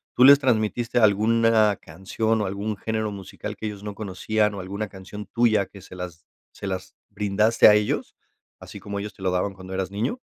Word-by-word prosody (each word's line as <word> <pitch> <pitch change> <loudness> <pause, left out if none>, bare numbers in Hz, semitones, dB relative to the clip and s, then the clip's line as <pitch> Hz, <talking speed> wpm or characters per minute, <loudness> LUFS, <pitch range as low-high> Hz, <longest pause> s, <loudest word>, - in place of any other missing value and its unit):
¿tú 125 - +5
les 140 +1 +9
transmitiste 120 -2 0
alguna 110 0 +4
canción 110 +4 -2
o 100 - -1
algún 100 +2 -3
género 110 0 -2
musical 100 -2 -7
que 110 - -4
ellos 105 -1 -7
no 105 -1 -5
conocían, 105 +1 -1
o - - -6
alguna 100 +3 -4
canción 95 +2 -9
tuya 110 -5 +2
que 100 +1 -14
se 90 - -12
las 90 -3 -8 0.3
se - - -9
las 95 -1 -5 0.2
brindaste 105 +3 +3
a 105 - +8
ellos, 105 0 -1 0.4
así - - -10
como 100 0 -6
ellos 105 +1 -5
te - - -18
lo 95 - +1
daban 90 +2 -1
cuando 95 0 -11
eras 95 0 -2
niño? 110 - -2
105 Hz, 200 wpm, -24 LUFS, 95-110 Hz, 0.4 s, les